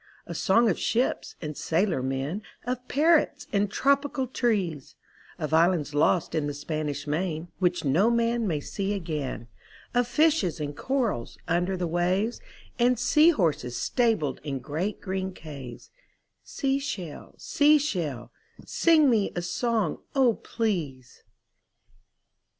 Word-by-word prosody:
A -, -, -6 dB
song 230 Hz, +5 st, +3 dB
of 190 Hz, -, +1 dB
ships 245 Hz, +3 st, 0 dB
and 150 Hz, -1 st, -4 dB
sailor 170 Hz, -2 st, 0 dB
men 135 Hz, +9 st, -2 dB, 0.2 s
Of 250 Hz, 0 st, -3 dB
parrots 295 Hz, -1 st, +2 dB
and 200 Hz, 0 st, +2 dB
tropical 280 Hz, +3 st, +1 dB
trees; 200 Hz, -, -1 dB, 0.4 s
Of 155 Hz, 0 st, -4 dB
islands 165 Hz, -2 st, +3 dB
lost 155 Hz, +4 st, +2 dB
in 155 Hz, -3 st, 0 dB
the 145 Hz, -, -4 dB
Spanish 145 Hz, -1 st, -3 dB
Main 160 Hz, +2 st, -2 dB
Which 180 Hz, -3 st, +1 dB
no 170 Hz, +11 st, +3 dB
man 235 Hz, -1 st, +1 dB
may 155 Hz, -5 st, -1 dB
see 200 Hz, +6 st, -3 dB
again, 150 Hz, -, -4 dB, 0.5 s
Of 245 Hz, -1 st, +2 dB
fishes 295 Hz, -, +2 dB
and 145 Hz, -1 st, -4 dB
corals 245 Hz, -, -2 dB
under 175 Hz, +3 st, 0 dB
the 180 Hz, -, -1 dB
waves, 180 Hz, +7 st, 0 dB, 0.4 s
And 245 Hz, +1 st, +4 dB
sea 305 Hz, +7 st, +5 dB
horses 160 Hz, -, 0 dB
stabled 220 Hz, -, 0 dB
in 140 Hz, -3 st, -3 dB
great 160 Hz, +10 st, -3 dB
green 190 Hz, -1 st, -3 dB
caves 140 Hz, -8 st, -10 dB, 0.3 s
— -, -, -52 dB
Sea 275 Hz, 0 st, -1 dB
Shell, 185 Hz, -, -6 dB
Sea 300 Hz, +1 st, +4 dB
Shell, 165 Hz, -, -3 dB, 0.3 s
Sing 320 Hz, -3 st, +4 dB
me 220 Hz, -6 st, +2 dB
a 175 Hz, -, -2 dB
song, 220 Hz, -1 st, -1 dB, 0.2 s
O 260 Hz, -4 st, +4 dB
please. 165 Hz, -, -3 dB
185 Hz, 135 wpm, -27 LUFS, 155-240 Hz, 0.5 s, sea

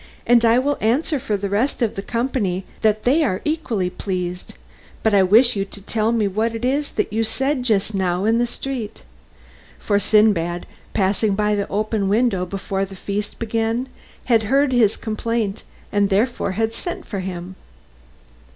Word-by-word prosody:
"And 240 Hz, -1 st, +5 dB
I 230 Hz, +1 st, +5 dB
will 285 Hz, +3 st, 0 dB
answer 270 Hz, +7 st, +1 dB
for 220 Hz, -6 st, -1 dB
the 200 Hz, 0 st, -3 dB
rest 225 Hz, +6 st, 0 dB
of 220 Hz, -, 0 dB
the 195 Hz, -, -4 dB
company 210 Hz, -5 st, -1 dB, 0.2 s
that 215 Hz, 0 st, +2 dB
they 280 Hz, +7 st, +3 dB
are 195 Hz, -11 st, +1 dB
equally 235 Hz, -, -1 dB
pleased, 180 Hz, -2 st, -4 dB, 0.5 s
but 220 Hz, -, +2 dB
I 200 Hz, -, +6 dB
wish 225 Hz, +6 st, +5 dB
you 195 Hz, -, 0 dB
to 200 Hz, -, -9 dB
tell 220 Hz, +2 st, 0 dB
me 225 Hz, -3 st, +1 dB
what 220 Hz, +4 st, -1 dB
it 225 Hz, +2 st, -3 dB
was 280 Hz, +3 st, 0 dB
that -, -, -1 dB
you 225 Hz, +1 st, +1 dB
said 265 Hz, +4 st, 0 dB
just 215 Hz, -3 st, +1 dB
now 185 Hz, -1 st, 0 dB
in 225 Hz, +2 st, +3 dB
the 240 Hz, -, +2 dB
street." 245 Hz, -2 st, -5 dB, 0.7 s
For 205 Hz, -1 st, +1 dB
Sindbad, 195 Hz, -6 st, +2 dB, 0.3 s
passing 200 Hz, +1 st, +1 dB
by 210 Hz, +1 st, +1 dB
the 200 Hz, -1 st, -1 dB
open 210 Hz, -1 st, 0 dB
window 205 Hz, -4 st, +1 dB
before 195 Hz, +1 st, -3 dB
the 195 Hz, 0 st, -6 dB
feast 205 Hz, +2 st, -4 dB
began, 230 Hz, +3 st, -1 dB, 0.4 s
had 230 Hz, -3 st, +4 dB
heard 275 Hz, 0 st, +3 dB
his 225 Hz, -4 st, +3 dB
complaint 220 Hz, -1 st, -2 dB, 0.3 s
and 205 Hz, -1 st, +2 dB
therefore 210 Hz, 0 st, 0 dB
had 225 Hz, +2 st, -1 dB
sent 350 Hz, +9 st, -5 dB
for 200 Hz, -, -4 dB
him. 185 Hz, 0 st, -6 dB
215 Hz, 175 wpm, -21 LUFS, 195-240 Hz, 0.7 s, I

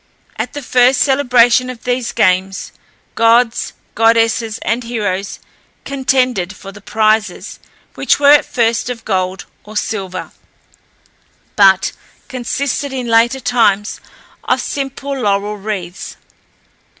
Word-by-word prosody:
At -, -, -4 dB
the 290 Hz, -1 st, -6 dB
first 250 Hz, +1 st, +3 dB
celebration 255 Hz, -3 st, +3 dB
of 245 Hz, -3 st, -9 dB
these 245 Hz, -1 st, -1 dB
games, 185 Hz, +1 st, 0 dB, 0.4 s
gods, 230 Hz, +1 st, +2 dB, 0.2 s
goddesses, 225 Hz, 0 st, +2 dB
and 235 Hz, +2 st, -1 dB
heroes 205 Hz, -5 st, -3 dB, 0.5 s
contended 255 Hz, -8 st, 0 dB
for 195 Hz, -, -10 dB
the 205 Hz, +1 st, -14 dB
prizes, 215 Hz, -2 st, 0 dB, 0.3 s
which -, -, +1 dB
were 285 Hz, 0 st, +6 dB
at 295 Hz, -, +6 dB
first 235 Hz, 0 st, 0 dB
of 240 Hz, -2 st, -6 dB
gold 185 Hz, -2 st, -2 dB, 0.2 s
or 215 Hz, +1 st, -8 dB
silver, 190 Hz, -4 st, -4 dB, 1.2 s
but 190 Hz, -2 st, +4 dB, 0.4 s
consisted, 270 Hz, +2 st, -3 dB
in 260 Hz, -2 st, -4 dB
later 230 Hz, +3 st, +3 dB
times, 215 Hz, -5 st, +1 dB, 0.4 s
of -, -, +1 dB
simple 275 Hz, 0 st, -4 dB
laurel 205 Hz, 0 st, 0 dB
wreaths. 195 Hz, -4 st, -6 dB
230 Hz, 115 wpm, -16 LUFS, 205-250 Hz, 1.2 s, were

